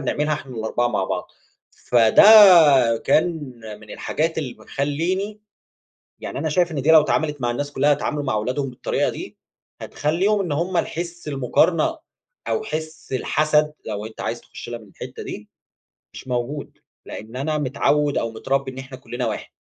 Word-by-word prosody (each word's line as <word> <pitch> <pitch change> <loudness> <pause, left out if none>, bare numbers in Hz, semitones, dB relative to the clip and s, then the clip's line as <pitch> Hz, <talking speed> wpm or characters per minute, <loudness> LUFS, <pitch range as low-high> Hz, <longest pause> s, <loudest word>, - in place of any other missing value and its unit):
بنعملها 150 +2 -1
إحنا 130 -4 -8
ال4 110 +2 -1
مع 115 - -1
بعض، - - -4 0.4
فده 115 -3 +4 0.8
كان 160 - +4 0.5
من 110 - -15
الحاجات 160 +1 -2
اللي 135 -6 -4
ب - - -19
خلّيني، 180 +9 -2 0.8
يعني - - -6
أنا 155 +2 -1
شايف 175 +2 +1
إن 140 -3 -2
دي 155 - +4
لو 160 -1 +8
اتعملت 150 -1 -1
مع 120 -1 0
الناس 145 +4 -4
كُلّها 145 +2 +2
يتعاملوا 145 0 -1
مع 120 -6 -1
ولادهم 130 +5 -2
بالطريقة 125 - -1
دي، - - -8 0.4
هتخلّيهم 190 +8 0
إن 180 -5 -3
هُم 170 +5 -1
الحس 170 0 -4
المقارنة، 165 - +1 0.5
أو 440 - -1
حس 155 - -6
الحسد، 150 +3 +1
لو 105 -1 -4
أنت 110 - -9
عايز - - -3
تخُش - - -11
لها 120 - -5
من 110 - -16
الحتة - - -9
دي، - - -8 0.6
مش - - -11
موجود. 125 +4 -4 0.3
لأن 110 +3 -9
أنا 150 +3 -1
متعود 145 +1 +1
أو 115 -1 -1
متربي 135 +4 -2
إن 130 - -13
إحنا 130 0 -8
كُلّنا 125 -1 -4
واحد. 110 - -4
145 Hz, 165 wpm, -22 LUFS, 125-155 Hz, 0.8 s, لو